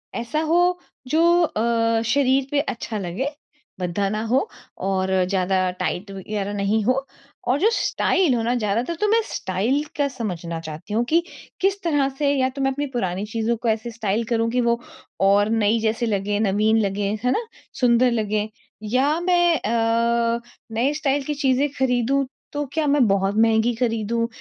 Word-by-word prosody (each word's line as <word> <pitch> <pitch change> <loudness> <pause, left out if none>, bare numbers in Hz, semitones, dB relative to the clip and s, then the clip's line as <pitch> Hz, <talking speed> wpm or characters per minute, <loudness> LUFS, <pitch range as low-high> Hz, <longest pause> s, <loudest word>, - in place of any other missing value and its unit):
ऐसा 235 +7 -2
हो, 350 +3 +2 0.3
जो 340 +5 +4
अ, 230 -4 +1
शरीर 265 +2 +2
पे 290 - +2
अच्छा 235 -6 -3
लगे, 195 +8 -3 0.5
भद्दा 180 +2 -1
ना 215 +1 -2
हो 255 - +1 0.3
और 190 -1 0 0.2
ज़्यादा 185 -1 +1
टाइट 200 +3 -2
वगैरह 200 +1 -4
नहीं 205 +2 0
हो 255 +4 +1 0.4
और 255 +3 +2
जो 415 +7 +4
स्टाइल 370 - +1
हो 235 - 0
ना 235 +2 +1
ज़्यादातर 230 +7 -1
तो 420 - +3
मैं 450 +2 +4
स्टाइल 215 +10 0
का 285 -1 +2
समझना 180 -10 -4
चाहती 160 +5 -8
हूँ, 230 +2 +2
कि 325 +7 +3 0.4
किस 390 +1 +2
तरह 290 -5 +2
से 285 -1 +2
या 260 -2 +1
तो 270 +1 -6
मैं 270 0 +1 0.2
पुरानी 195 -5 -2
चीज़ों 225 +2 -1
को 235 - -4
ऐसे 220 +2 -1
स्टाइल 220 -1 -1
करूँ 230 -1 +1
कि 250 +1 +1
वो 235 0 +1 0.5
और 205 +1 +4
नई 225 0 +2
जैसी 225 +2 0
लगे, 205 -1 -1
नवीन 215 +1 +2
लगे, 200 0 -1
है 250 - +2
ना? 460 - 0 0.3
सुंदर 245 -1 +3
लगें, 215 -2 -1 0.3
या 265 +8 +1
मैं 350 -2 +3
अ, 230 +1 +1 0.3
नए 240 +6 +1
स्टाइल 285 -2 0
की 300 - -1
चीज़े 275 0 +2
खरीदूँ, 265 +1 +1 0.3
तो 290 0 -2
क्या 315 0 0
मैं 280 -4 +4
बहुत 195 0 +1
महँगी 225 +1 +3
खरीदूँ 230 -1 0
235 Hz, 170 wpm, -22 LUFS, 210-275 Hz, 0.5 s, जो